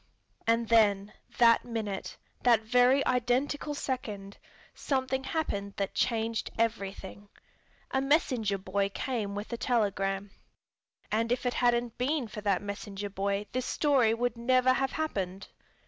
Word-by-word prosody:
And 230 0 +2
then, 210 -3 +3 0.2
that 230 -1 +6
minute, 220 -5 -4 0.2
that 235 -3 +4
very 250 +4 +4
identical 255 +4 0
second, 210 -8 -4 0.3
something 265 -1 -1
happened 200 -12 -2
that 195 -1 -2
changed 225 -1 0
everything. 205 -3 -3 0.6
A 265 - +1
messenger 255 -8 +1
boy 195 +1 -1
came 210 -2 -3
with 205 +4 -5
a - - -2
telegram. 200 -5 0 0.8
And 230 +2 +1
if 250 - 0
it 245 - +1
hadn't 240 -1 +1
been 265 0 0
for 210 0 -7
that 200 -2 +1
messenger 200 0 -5
boy 200 +1 -1
this 255 0 -2
story 260 -7 +3
would 245 0 -1
never 255 +1 +4
have 270 0 -1
happened. 195 - -3
230 Hz, 130 wpm, -29 LUFS, 200-255 Hz, 0.8 s, that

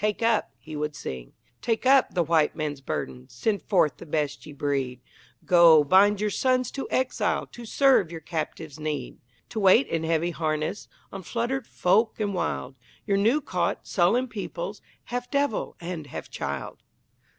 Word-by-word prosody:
"Take 210 +2 0
up," 225 -2 +2
he 155 -1 -10
would 150 0 -3
sing 65 - -7 0.3
Take 230 +1 -1
up 265 -4 +4
the 175 - +3
White 160 -1 +2
Man's 150 -3 -3
burden, 125 -1 -5
Send 200 - -1
forth 155 -9 +2
the - - -10
best 150 -1 -2
ye - - -8
breed, 135 -3 -2 0.5
Go, 170 -4 +7
bind 195 +6 +5
your 210 0 0
sons 255 0 +1
to 270 - -5
exile, 260 0 0
To 240 - -11
serve 260 - +4
your 165 - -6
captives' 160 -1 -5
need; 150 -1 -4 0.3
To 220 - -4
wait 200 +6 +6
in 165 -1 -2
heavy 165 +1 +1
harness 155 +4 -2 0.2
On 195 - -6
fluttered 235 +7 -2
folk 215 +7 +2
and 205 -2 -1
wild 70 - -2 0.3
Your 200 -2 +1
new 230 +9 +3
caught, 180 -9 -2
sullen 230 +9 +2
peoples, 240 - -6 0.2
Half 245 0 -4
devil 280 -5 -1
and 170 -3 -6
half - - -8
child. - - -5
180 Hz, 165 wpm, -26 LUFS, 155-230 Hz, 0.5 s, Go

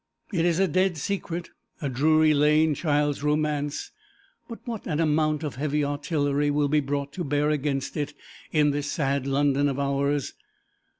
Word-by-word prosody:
It 170 -2 +1
is 170 -2 +2
a 195 0 +3
dead 185 +1 +1
secret, 175 +1 -4 0.3
a 145 - -2
Drury 155 +4 +3
Lane 150 +1 +4
child's 145 -2 0
romance; 150 -1 -1 0.6
but 230 - -6
what 230 -4 -5
an 155 -4 -1
amount 155 -1 +1
of 145 -4 -4
heavy 150 +1 0
artillery 145 0 0
will 145 0 +1
be 150 +1 +3
brought 140 0 -3
to 180 - -3
bear 145 0 +1
against 140 -2 -2
it 145 -1 -3 0.4
in 150 -1 +3
this 145 0 -2
sad 140 -4 -1
London 140 +1 +2
of 135 - -3
ours. 140 0 0
150 Hz, 165 wpm, -26 LUFS, 140-155 Hz, 0.6 s, Lane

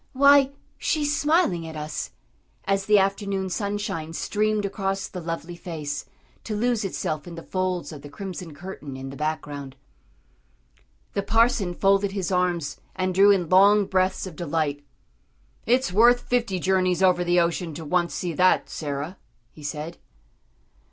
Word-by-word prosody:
"Why, 280 0 +6 0.3
she's 295 -2 +1
smiling 295 - +2
at 160 - -8
us," 150 0 -4 0.6
as 195 0 0
the 210 0 +6
afternoon 195 -1 0
sunshine 200 -6 -3
streamed 210 +3 0
across 195 -1 -2
the 180 - -7
lovely 165 +1 -5
face, 150 -4 -5 0.4
to 215 - -4
lose 235 +1 +1
itself 155 -5 -3
in 170 - -8
the 165 - -8
folds 185 -2 -2
of 150 -3 -9
the 145 - -10
crimson 180 -1 -7
curtain 150 -5 -8
in 135 0 -7
the - - -9
background. 145 -3 -4 1.4
The 200 - 0
parson 210 -3 +2
folded 195 +1 +2
his 195 -2 -2
arms 175 -5 0 0.2
and 185 0 -1
drew 195 +2 +6
in 190 -4 +3
long 200 +2 +6
breaths 185 0 +1
of 185 -4 -8
delight. 150 -3 -2 0.8
"It's 250 -4 +2
worth 240 +4 +6
fifty 235 -8 0
journeys 185 0 +2
over 180 -1 +4
the 175 0 +3
ocean 170 -1 0
to 160 - -7
once 175 +2 0
see 175 -2 -2
that, 185 +3 +3
Sarah," 145 +4 -4 0.3
he 155 - -15
said. 150 +3 -5
185 Hz, 150 wpm, -25 LUFS, 165-200 Hz, 1.4 s, Why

